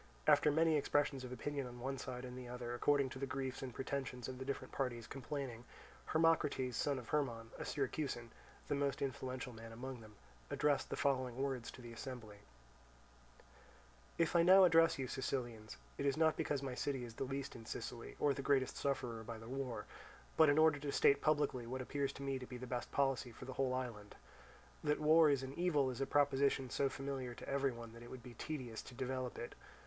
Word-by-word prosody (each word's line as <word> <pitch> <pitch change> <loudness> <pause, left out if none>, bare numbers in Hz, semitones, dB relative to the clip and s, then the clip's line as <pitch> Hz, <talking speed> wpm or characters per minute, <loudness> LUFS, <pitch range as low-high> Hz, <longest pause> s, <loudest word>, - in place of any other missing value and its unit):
After - - +6
many 160 +1 +4
expressions 145 -2 +1
of 125 - -6
opinion 140 +1 -3
on 120 0 -9
one 135 +2 -3
side 125 0 -5
and 125 0 -7
the 125 -1 -7
other, 120 -1 -4
according 140 +2 +3
to 130 - -7
the 135 - -2
griefs 130 -1 -3
and 130 -2 -4
pretensions 130 -1 -3
of 130 -1 -6
the 130 - -4
different 140 - -3
parties 120 -4 -2
complaining, 135 -3 -5 0.4
Hermocrates, 160 -6 +2
son 140 +3 +1
of 125 -3 -8
Hermon, 120 -6 -1
a - - -3
Syracusan, 135 -4 -2 0.4
the - - 0
most 140 -1 0
influential 130 -1 -3
man 115 0 -9
among 125 +1 -6
them, 110 -1 -13 0.3
addressed 145 -2 +2
the - - -2
following 130 -3 +1
words 130 -3 -1
to 125 - -10
the 120 -1 -8
assembly: 115 -3 -7 1.8
"If 165 +1 +2
I 170 - +7
now 190 +3 +8
address 165 -2 +6
you, 130 -2 -2
Sicilians, 120 - -3 0.2
it 140 - +1
is 140 - +2
not 160 -1 +4
because 140 -2 -1
my 130 -2 -2
city 135 0 -1
is 115 - -9
the 115 - -3
least 135 +1 -4
in 115 -1 -10
Sicily 120 -2 -5
or 145 -1 +4
the 140 - -4
greatest 135 -2 +2
sufferer 125 -5 -1
by 115 0 -6
the 115 0 -10
war, 125 -4 -3 0.5
but 160 -2 +7
in 145 - +4
order 155 -2 +6
to 145 0 -3
state 140 0 +5
publicly 145 -6 +1
what 130 +2 -3
appears 140 +1 -1
to 140 - -7
me 135 -1 -1
to 125 - -7
be 125 - -6
the 130 - -6
best 125 -1 -3
policy 135 -3 +1
for 115 - -10
the 130 - -5
whole 130 -1 +1
island. 115 -5 -5 0.7
That 150 0 +2
war 155 +1 +7
is 140 -2 +2
an 130 +1 -5
evil 150 -6 +2
is 125 - -5
a 135 - +1
proposition 140 -2 +3
so 140 - +2
familiar 135 -2 -4
to - - -9
every 140 -1 +1
one 115 -1 -8
that 115 - -11
it 120 - -10
would 130 -2 -8
be 125 - -9
tedious 125 -3 -5
to 125 - -11
develop 130 -1 -3
it. 120 - -5
130 Hz, 210 wpm, -38 LUFS, 125-140 Hz, 1.8 s, now